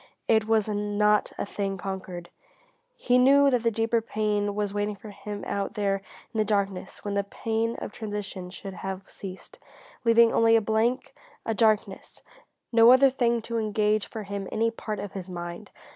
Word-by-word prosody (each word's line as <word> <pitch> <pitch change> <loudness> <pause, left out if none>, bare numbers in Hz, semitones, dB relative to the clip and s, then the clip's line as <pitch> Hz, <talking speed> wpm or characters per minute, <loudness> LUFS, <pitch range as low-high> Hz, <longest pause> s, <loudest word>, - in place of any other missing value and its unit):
It 220 -1 +3
was 220 -2 +2
not 210 0 +1
a - - -2
thing 200 -1 -3
conquered; 185 -2 -6 0.6
he 250 0 +2
knew 280 +2 +6
that 250 -2 +2
the 230 - +2
deeper 225 +1 +1
pain 210 -2 -1
was 205 -1 -2
waiting 205 0 -1
for 210 +1 -11
him 205 0 -7
out 200 +2 -3
there 200 -2 +1 0.4
in 220 - -2
the - - +4
darkness 200 -3 -2
when 205 - -2
the 200 0 +1
pain 225 +3 -2
of - - -6
transition 205 -4 -6
should 195 +1 -8
have 190 +1 -6
ceased, 190 -1 -9 0.4
leaving 230 -1 +5
only 230 0 +5
a - - +6
blank, 220 +4 0 0.3
a 225 - 0
darkness, 215 -1 0 0.5
no 230 0 +7
other 260 +1 +6
thing 235 -3 +1
to 230 0 -2
engage 215 -1 +1
for 220 -2 -6
him 200 -1 -5
any 230 +1 +1
part 215 -2 -5
of 200 -1 -6
his 190 -1 -6
mind. 175 +2 -7
210 Hz, 175 wpm, -26 LUFS, 200-225 Hz, 0.6 s, no